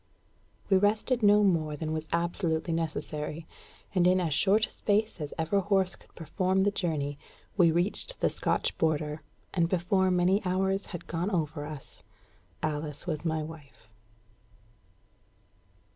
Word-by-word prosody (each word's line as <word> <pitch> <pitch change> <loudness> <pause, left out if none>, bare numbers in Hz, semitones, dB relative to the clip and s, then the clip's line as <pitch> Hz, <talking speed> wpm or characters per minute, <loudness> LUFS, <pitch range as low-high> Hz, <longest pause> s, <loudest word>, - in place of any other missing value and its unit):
We 195 - +5
rested 215 +5 +1
no 210 0 +6
more 160 -6 +2
than 155 +1 -3
was 155 0 -3
absolutely 170 -1 0
necessary; 155 -1 -3 0.5
and 180 -2 +4
in 185 +1 +4
as 165 -4 0
short 205 +7 +4
a - - -15
space 210 -3 0
as 150 - -4
ever 165 +5 +1
horse 195 -1 +1
could - - -23
perform 185 +4 0
the 205 - +2
journey, 145 -7 -2 0.4
we 175 -4 +5
reached 180 - +1
the - - +3
Scotch - - 0
border, 155 -1 0 0.3
and 165 -1 +2
before 190 +1 +2
many 180 +3 +3
more 180 -1 0 0.2
hours 195 0 -4
had 175 - -7
gone 170 +3 -2
over 155 -5 -2
us, 150 -3 -9 0.6
Alice 150 -1 -3
was 160 -4 -2
my 160 -2 -1
wife. 150 -7 -12
170 Hz, 145 wpm, -29 LUFS, 155-190 Hz, 0.6 s, no